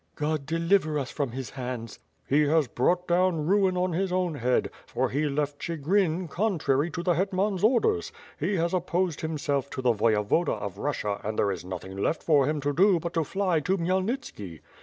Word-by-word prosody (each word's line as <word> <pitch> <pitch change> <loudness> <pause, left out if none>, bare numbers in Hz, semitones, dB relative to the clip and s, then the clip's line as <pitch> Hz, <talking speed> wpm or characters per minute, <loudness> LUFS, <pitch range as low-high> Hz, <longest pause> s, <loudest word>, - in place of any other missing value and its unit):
"God 150 -2 -2
deliver 165 -1 +2
us 135 -2 -3
from 140 -4 -2
his 130 +1 -6
hands!" 125 -4 -6 0.3
"He 145 +3 +3
has 155 -2 +3
brought 175 +10 +1
down 175 -3 +2
ruin 190 0 +2
on 180 0 +1
his 190 +2 -1
own 180 -2 0
head, 125 -3 0 0.2
for - - -1
he 145 +3 0
left 145 0 -2
Chigrin, 170 +2 0
contrary 160 -6 0
to 170 +1 -5
the 175 0 +3
hctman's 190 +2 0
orders; 220 - +2 0.3
he 185 +7 0
has 170 0 0
opposed 180 -2 0
himself 145 -3 -1
to - - -5
the 125 -2 +4
Voyevoda 110 +8 +2
of 100 -3 -6
Russia 105 -8 -2
and 110 +1 -3
there 100 - +2
is 95 - -5
nothing 95 +1 -7
left 100 +11 -1
for 145 -5 +4
him 150 0 0
to 145 +1 0
do 185 +2 +4
but 170 +1 -5
to 165 - +1
fly 185 0 0
to 185 +6 0
Khmyelnitski. 185 - -2
160 Hz, 190 wpm, -27 LUFS, 135-180 Hz, 0.3 s, the